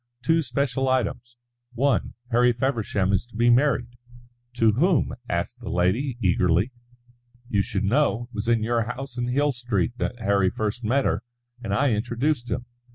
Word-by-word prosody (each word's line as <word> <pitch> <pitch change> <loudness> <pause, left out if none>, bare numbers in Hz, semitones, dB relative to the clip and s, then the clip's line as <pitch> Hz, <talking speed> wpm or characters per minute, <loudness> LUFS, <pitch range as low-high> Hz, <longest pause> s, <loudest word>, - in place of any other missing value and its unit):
"Two 165 +5 +3
special 135 0 -1
items. 120 -1 -1 0.4
One, 135 +3 0 0.2
Harry 120 +1 +4
Feversham 110 -6 0
is 100 - +2
to 120 - -18
be 120 +2 +4
married." 125 0 +3 0.7
"To 115 -2 +4
whom?" 155 - +2 0.2
asked - - -2
the - - -7
lady, 110 +10 0
eagerly. 90 +2 +2 0.8
"You 105 -5 +2
should 100 - -2
know. 120 +2 +2
It 120 +1 -15
was 105 +1 -4
in 115 -2 +2
your 115 +1 +1
house 125 +1 -6
in 120 - -1
Hill 145 +4 +2
Street 120 -2 -2
that 120 - -2
Harry 100 -4 +2
first 110 +4 -3
met 130 +5 +1
her; 105 - 0 0.4
and 100 - -4
I 135 +6 +2
introduced 120 +4 -1
him. 125 0 -2
120 Hz, 165 wpm, -25 LUFS, 110-130 Hz, 0.8 s, Harry